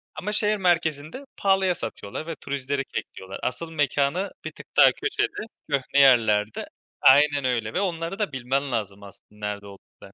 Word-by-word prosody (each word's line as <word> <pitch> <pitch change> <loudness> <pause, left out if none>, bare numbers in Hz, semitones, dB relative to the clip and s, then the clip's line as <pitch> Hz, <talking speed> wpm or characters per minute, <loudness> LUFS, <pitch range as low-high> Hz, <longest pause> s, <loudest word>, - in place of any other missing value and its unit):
Ama 210 +3 -4
şehir 210 0 +2
merkezinde 170 - 0
pahalıya 190 -2 +2
satıyorlar 110 +8 -6
ve 165 - -4
turistleri 140 0 -2
kekliyorlar. 95 +1 -7
Asıl 165 +6 -3
mekânı 145 +5 0
bir - - -4
tık - - -13
daha - - +8
köşede, 415 - -2 0.2
köhne 140 0 +1
yerlerde. 110 -6 +4 0.4
Aynen 145 0 +5
öyle. 115 -4 -1
Ve 190 - 0
onları 170 +1 -3
da 205 -8 -1
bilmen 130 +2 -2
lazım 100 -3 -3
aslında 105 +1 -9
nerede 100 0 -5
olduklarını. 100 0 -15
140 Hz, 155 wpm, -25 LUFS, 115-175 Hz, 0.4 s, daha